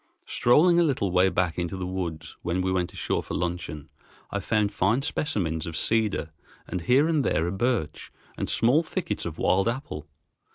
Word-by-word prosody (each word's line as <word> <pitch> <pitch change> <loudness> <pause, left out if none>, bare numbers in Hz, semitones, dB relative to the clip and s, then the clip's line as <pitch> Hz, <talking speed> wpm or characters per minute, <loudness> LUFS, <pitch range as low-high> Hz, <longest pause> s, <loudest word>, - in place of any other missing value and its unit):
Strolling 170 +8 +4
a - - +5
little 125 - 0
way 90 +1 +4
back 90 -2 0
into 90 +2 -3
the 90 - -3
woods 85 -4 -4
when 90 +2 -1
we 95 - 0
went 90 -2 0
ashore - - -1
for - - -6
luncheon, 85 -4 -3 0.4
I - - -1
found 105 -2 0
fine 110 +9 +2
specimens 90 - -1
of 85 - -4
cedar, 110 -7 +1 0.4
and 90 - -3
here 130 - +4
and 155 -4 +2
there 80 -9 +1
a 85 - -1
birch, 100 -6 -1 0.2
and - - -3
small 125 +7 +4
thickets 160 - -3
of 80 -1 -7
wild 95 +3 +2
apple. 115 - -4
95 Hz, 180 wpm, -26 LUFS, 85-125 Hz, 0.4 s, a